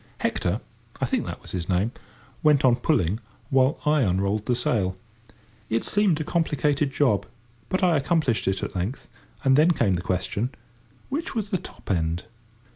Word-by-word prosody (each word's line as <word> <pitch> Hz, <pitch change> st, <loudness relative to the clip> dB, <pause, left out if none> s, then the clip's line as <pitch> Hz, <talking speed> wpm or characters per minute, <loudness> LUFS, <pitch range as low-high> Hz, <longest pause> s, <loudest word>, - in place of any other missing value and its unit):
Hector—I -, -, -3 dB
think -, -, -1 dB
that -, -, -6 dB
was -, -, -8 dB
his 90 Hz, -1 st, -3 dB
name—went 125 Hz, -, 0 dB
on 120 Hz, -2 st, +5 dB
pulling 110 Hz, -, +1 dB, 0.3 s
while 135 Hz, +3 st, +3 dB
I 150 Hz, -1 st, +4 dB
unrolled 100 Hz, 0 st, 0 dB
the 125 Hz, -, +3 dB
sail. 100 Hz, -6 st, 0 dB, 0.7 s
It 115 Hz, +1 st, +1 dB
seemed 200 Hz, -6 st, +2 dB
a -, -, -1 dB
complicated 150 Hz, -3 st, +1 dB
job, 135 Hz, -7 st, +2 dB, 0.4 s
but 185 Hz, -, 0 dB
I 175 Hz, -3 st, +4 dB
accomplished 140 Hz, -, +1 dB
it 95 Hz, 0 st, 0 dB
at -, -, -4 dB
length, 95 Hz, +9 st, -3 dB, 0.4 s
and 135 Hz, -1 st, +5 dB
then 155 Hz, +4 st, +5 dB
came 120 Hz, -, +2 dB
the 85 Hz, -, -1 dB
question, 100 Hz, +7 st, -2 dB, 0.5 s
which 290 Hz, +1 st, -3 dB
was 210 Hz, -2 st, -2 dB
the 185 Hz, -, +1 dB
top -, -, -7 dB
end? 85 Hz, -1 st, 0 dB
130 Hz, 160 wpm, -25 LUFS, 100-155 Hz, 0.7 s, on